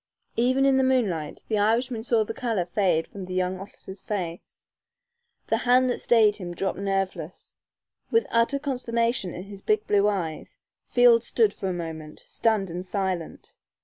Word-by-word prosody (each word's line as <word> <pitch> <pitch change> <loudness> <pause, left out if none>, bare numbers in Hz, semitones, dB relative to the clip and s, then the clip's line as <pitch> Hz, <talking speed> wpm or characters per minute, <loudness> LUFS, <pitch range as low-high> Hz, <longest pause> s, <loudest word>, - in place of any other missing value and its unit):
Even 255 +3 +2
in 270 -1 +4
the 265 - +3
moonlight 205 - 0
the 215 -2 0
Irishman 230 +3 +1
saw 230 -1 +2
the 220 - -5
color 225 -7 -1
fade 175 -3 +1
from 195 -2 -9
the 185 0 -6
young 185 0 -1
officer's 195 0 -10
face. 180 -5 -6 0.8
The - - +1
hand 250 0 +3
that - - -3
stayed 220 -3 +4
him 175 -3 -6
dropped 195 +2 -2
nerveless. 195 -4 -3 0.5
With 455 0 +3
utter 230 +4 +2
consternation 235 - -1
in 180 - -6
his 200 0 -10
big 430 0 +1
blue 205 0 +3
eyes, 175 -7 -3 0.3
Field 240 -2 +5
stood 220 -3 +2
for 190 - -4
a - - -1
moment, 160 -3 -6
stunned 210 -5 0
and 175 +2 -4
silent. 185 -3 -4
205 Hz, 165 wpm, -25 LUFS, 185-235 Hz, 0.8 s, Field